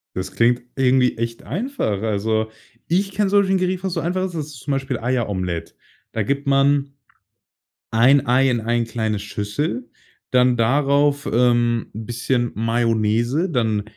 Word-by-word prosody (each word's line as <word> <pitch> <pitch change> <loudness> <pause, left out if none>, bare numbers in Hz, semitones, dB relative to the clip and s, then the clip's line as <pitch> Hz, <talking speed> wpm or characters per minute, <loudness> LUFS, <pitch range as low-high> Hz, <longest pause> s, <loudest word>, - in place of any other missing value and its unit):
Das 95 0 -4
klingt 120 +3 +2
irgendwie 130 -1 +3
echt 115 0 -3
einfach. 165 - -2
Also, 110 +1 0 0.4
ich 195 +3 +1
kenne 200 0 0
solche 195 -1 +3
Gerichte, 185 0 -1
was 190 - -1
so 165 - -1
einfach 185 +3 -1
ist, 185 -2 -4
das 155 -3 -3
ist 145 -4 -11
zum 140 +4 -4
Beispiel 135 -2 -2
Eieromelett. 100 -8 -2 0.4
Da 110 - -1
gibt 140 +6 -2
man 140 0 +2 1.0
1 130 +5 +4
Ei 130 +2 +4
in 120 -2 +1
ein 120 +1 0
kleine 110 -2 -2
Schüssel, 105 - -3 0.4
dann 125 -1 +4
darauf, 140 +4 +2
ähm, 120 -1 +2
'n 110 +1 -6
bisschen 120 +1 -1
Mayonnaise, 115 - +1
dann 110 -7 0
125 Hz, 150 wpm, -21 LUFS, 115-145 Hz, 1.0 s, 1